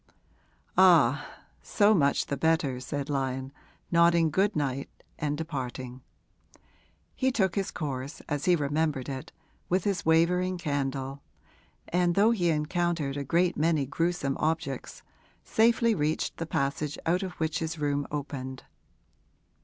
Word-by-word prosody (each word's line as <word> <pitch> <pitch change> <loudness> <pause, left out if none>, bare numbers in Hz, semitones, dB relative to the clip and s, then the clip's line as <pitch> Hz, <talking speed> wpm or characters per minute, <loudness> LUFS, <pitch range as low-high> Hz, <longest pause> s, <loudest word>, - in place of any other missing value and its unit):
'Ah, - - +6 0.4
so 210 0 +3
much 140 -7 +2
the 140 - -2
better,' 145 -3 +1
said 140 +2 -4
Lyon, 135 -2 -2 0.4
nodding 170 -1 +4
good 195 +6 +2
night 140 -2 -2 0.3
and 145 0 -1
departing. 130 -5 -5 1.1
He 260 0 +1
took 190 -7 +1
his 195 -2 -1
course, 140 -2 -5
as 145 -2 -3
he 180 - +5
remembered 150 -2 -1
it, 135 -2 -6 0.4
with 185 0 +1
his 195 -4 -1
wavering 180 +3 +2
candle, 140 -3 -3 0.7
and, 175 0 +1
though 210 +3 +5
he 180 -7 +1
encountered 160 -2 0
a 145 - -3
great 170 +5 +2
many 155 -2 +1
gruesome 160 -1 -1
objects, 155 -4 -2 0.4
safely 230 +1 +3
reached 155 -4 -1
the 165 - -4
passage 140 0 -1
out 175 +3 +2
of 185 -2 -4
which 160 -1 -2
his 160 0 -3
room 145 -1 -1
opened. 135 -3 -5
155 Hz, 130 wpm, -28 LUFS, 140-175 Hz, 1.1 s, Ah